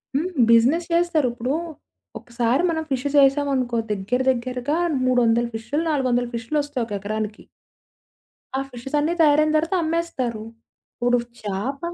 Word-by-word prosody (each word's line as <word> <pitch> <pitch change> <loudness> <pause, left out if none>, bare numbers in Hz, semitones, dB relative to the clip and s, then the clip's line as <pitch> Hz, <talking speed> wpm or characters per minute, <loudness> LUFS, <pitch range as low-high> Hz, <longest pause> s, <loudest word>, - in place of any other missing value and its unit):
హ్మ్. 325 +6 0 0.2
బిజినెస్ 255 +9 +4
చేస్తారు. 335 -5 +2
ఇప్పుడు, 250 +3 -2 0.7
ఒకసారి 240 +5 0
మనం 320 -1 -1
ఫిషెస్ 275 +2 0
ఏసామనుకో, 270 -4 0
దగ్గర 210 +5 -1
దగ్గరగా 255 +4 -2 0.3
300 240 -2 +3
ఫిష్‌లు, 235 +8 -2
400 250 -4 +1
ఫిష్‌లొస్తాయి, 285 +2 -2
ఒక 210 - -8
ఎకరానికి. 215 +1 -4 1.1
ఆ - - 0
ఫిషెసన్నీ 290 +6 -1
తయరైన 305 0 +4
తర్వాత 325 +4 0
అమ్మేస్తారు. 315 -9 -2 0.5
ఇప్పుడు 245 0 +2 0.3
చాప 210 +8 -3
255 Hz, 115 wpm, -23 LUFS, 235-295 Hz, 1.1 s, బిజినెస్